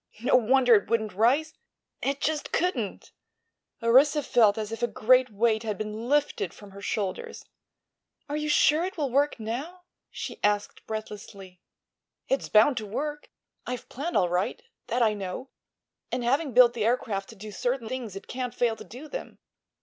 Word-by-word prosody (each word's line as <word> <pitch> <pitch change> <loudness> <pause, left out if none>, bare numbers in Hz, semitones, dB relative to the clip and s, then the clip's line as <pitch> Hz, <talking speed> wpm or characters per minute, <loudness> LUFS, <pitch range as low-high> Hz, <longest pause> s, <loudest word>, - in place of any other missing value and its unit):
No 250 - +4
wonder 250 +1 +5
it 205 - +3
wouldn't 220 -3 0
rise—it 275 +4 -1
just 310 -1 -1
couldn't!" 255 - -1 0.7
Orissa 275 +6 +5
felt 220 -5 +4
as 215 -1 -4
if 225 - -5
a 240 - +2
great 255 +3 +3
weight 220 +1 +1
had 215 -3 -3
been 215 +2 -5
lifted 290 - 0
from 205 -1 -13
her 200 +1 -11
shoulders. 200 -2 -3 0.8
"Are 290 - -3
you 300 0 -2
sure 300 +2 +4
it 375 +1 -4
will 285 -5 -1
work 280 0 +2
now?" 270 +12 -5 0.3
she - - -7
asked 205 0 0
breathlessly. 200 -4 -8 0.7
"It's 270 - -1
bound 230 +5 +5
to 220 - -3
work. 295 +8 -4 0.4
I've 250 -1 -5
planned 310 +7 -2
all 180 - +3
right; 180 - -1 0.2
that 245 0 +1
I 215 -2 +3
know; 200 +6 -6 0.6
and 250 0 -1
having 275 +4 +1
built 245 0 +6
the 230 -3 -2
aircraft 215 -4 0
to 225 - -11
do 210 +1 -9
certain 245 +3 -2
things 235 -5 -5
it 195 - -8
can't 250 -1 -4
fail 235 -3 +1
to - - -9
do 260 +7 -10
them. - - -7
240 Hz, 170 wpm, -27 LUFS, 215-275 Hz, 0.8 s, built